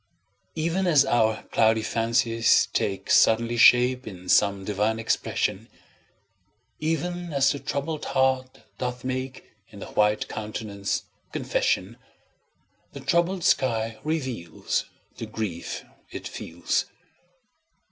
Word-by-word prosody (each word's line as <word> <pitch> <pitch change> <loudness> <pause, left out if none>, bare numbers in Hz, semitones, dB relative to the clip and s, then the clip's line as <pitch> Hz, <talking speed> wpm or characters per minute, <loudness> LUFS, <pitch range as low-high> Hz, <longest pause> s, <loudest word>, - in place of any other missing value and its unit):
Even 170 +4 0
as 150 -5 +5
our 110 -2 +2
cloudy 110 0 +3
fancies 115 +1 +2
take 95 -1 -1
Suddenly 115 +1 +4
shape 125 +1 +5
in 90 -3 -9
some 100 -1 +3
divine 105 +2 0
expression, 115 0 -1 1.1
Even 175 +2 -2
as 140 -1 +3
the 140 - -4
troubled 145 +3 -3
heart 130 -1 0 0.2
doth 125 0 -3
make 130 0 -5 0.2
In - - -14
the - - -7
white 105 0 +1
countenance 105 -2 -4 0.3
confession, - - -1 1.0
The - - -7
troubled 175 +1 +1
sky 115 -6 +1
reveals 130 - -2 0.3
The - - -6
grief 95 -7 -5 0.3
it - - -6
feels. 85 +1 -2
120 Hz, 105 wpm, -25 LUFS, 110-140 Hz, 1.1 s, as